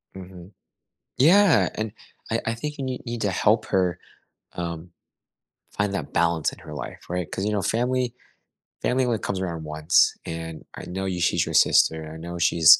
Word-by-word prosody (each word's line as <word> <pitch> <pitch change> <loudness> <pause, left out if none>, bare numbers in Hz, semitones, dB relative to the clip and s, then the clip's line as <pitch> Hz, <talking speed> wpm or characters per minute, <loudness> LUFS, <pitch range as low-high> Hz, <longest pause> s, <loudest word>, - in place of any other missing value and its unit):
Mhm. 95 0 -10 0.7
Yeah, 180 +7 +6
and 110 -1 -3 0.4
I 115 - +2
I 115 - 0
think 150 +6 -5
you 140 - -4
nee 130 -1 -3
need 120 -1 -4
to 100 - +1
help 110 +4 +3
her, 90 -3 +1 0.6
um, 85 0 -5 0.8
find 105 -1 -1
that - - -4
balance 85 -2 +2
in - - -12
her - - -10
life, - - -7
right? 90 -1 -3
'Cause, 95 - -3
you 105 - 0
know, 105 - +1
family 125 +2 0 0.7
family 130 +1 +2
only 120 -3 0
comes 95 - -2
around 85 -4 -3
once 75 +3 +3
and 80 -1 -6
I - - -8
know 95 +2 -4
y 95 -2 -2
she's 90 - +2
your - - -5
sister, 80 -1 +4
I 80 - -8
know 85 +2 -6
she's 80 -2 +7
95 Hz, 185 wpm, -25 LUFS, 85-115 Hz, 0.8 s, she's